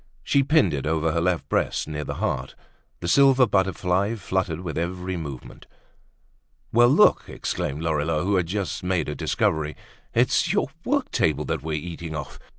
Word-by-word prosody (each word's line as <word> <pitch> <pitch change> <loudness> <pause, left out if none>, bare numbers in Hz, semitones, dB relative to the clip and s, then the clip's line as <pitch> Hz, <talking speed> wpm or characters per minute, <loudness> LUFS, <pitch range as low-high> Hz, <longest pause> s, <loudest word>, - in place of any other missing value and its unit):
She 140 - +3
pinned 140 - +3
it 70 +1 -2
over 80 0 +1
her 85 +1 0
left 90 -1 0
breast, - - 0
near 75 -1 -4
the - - -5
heart. 65 0 -2 0.5
The 85 - -3
silver 135 +4 +5
butterfly 95 0 +1
fluttered 95 -4 -2
with 85 -4 -5
her - - 0
every 90 +1 -3
movement. 70 -6 -8 1.1
"Well, 120 +1 +6
look," 140 - +5
exclaimed 75 +4 -3
Lorilleux, 75 0 0
who 100 +2 +1
had 90 -3 +1
just 100 +1 -3
made 90 -1 0
a 75 - -2
discovery, 75 +1 0 0.4
"it's - - +3
your - - +1 0.2
work 280 0 0
table 80 - +1
that - - -2
we're 80 0 -4
eating 80 +1 -5
off! 75 - -7
85 Hz, 170 wpm, -24 LUFS, 80-100 Hz, 1.1 s, Well